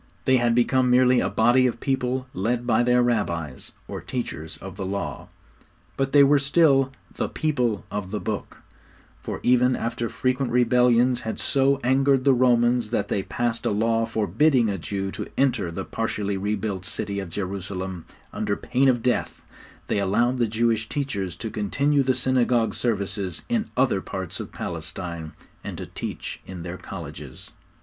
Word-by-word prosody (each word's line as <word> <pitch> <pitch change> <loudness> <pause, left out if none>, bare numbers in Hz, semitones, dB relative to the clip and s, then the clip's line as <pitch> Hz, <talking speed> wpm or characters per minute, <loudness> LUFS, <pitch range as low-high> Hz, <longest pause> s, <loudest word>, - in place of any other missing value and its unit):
They 130 0 +5
had 120 -1 +2
become 125 +1 +3
merely 125 0 +5
a - - 0
body 120 +3 +4
of 120 -1 -3
people 130 -1 -1
led 120 +5 -1
by 120 -1 +3
their 125 0 +3
Rabbis, 85 - -2 0.2
or - - -6
teachers 75 +4 -5
of 95 -1 -9
the 95 - -5
Law; 95 -7 -4 0.7
but 135 0 -1
they 145 -1 +7
were 140 +1 +5
still 140 -2 +3 0.2
'the - - -2
people 125 -9 -1
of 100 -2 -4
the 105 +1 -3
Book,' 105 -1 -5 0.6
for - - -5
even 125 +1 +4
after 115 0 -2
frequent 130 0 -1
rebellions 125 0 +3
had 110 - -4
so 140 0 +2
angered 135 +1 +3
the 135 - +5
Romans 120 -2 +3
that 120 - -1
they 100 - 0
passed 120 +3 -2
a - - +1
law 115 +2 +1
forbidding 115 - +2
a 95 - -3
Jew 95 +3 -3
to - - -5
enter 125 -9 +2
the 95 +3 -5
partially 105 -3 -2
re 100 +2 -1
built 100 -2 -3
city 100 +2 -2
of 95 -3 -5
Jerusalem 95 -1 -5 0.3
under - - -1
pain 130 +2 +2
of 120 -3 +1
death, 125 -1 -1 0.4
they 105 - 0
allowed 120 +6 +1
the 120 - +3
Jewish 110 0 0
teachers 100 - -3
to 110 - -5
continue 140 +8 +1
the 130 -1 +1
synagogue 125 -2 +2
services 100 -5 -2
in 230 -2 0
other 125 -7 +2
parts 95 -2 -5
of - - -6
Palestine, 85 -3 -5 0.3
and - - -6
to - - -5
teach - - -6
in 90 -3 -7
their 90 +1 -6
colleges. 75 -9 -9
115 Hz, 170 wpm, -24 LUFS, 100-130 Hz, 0.7 s, they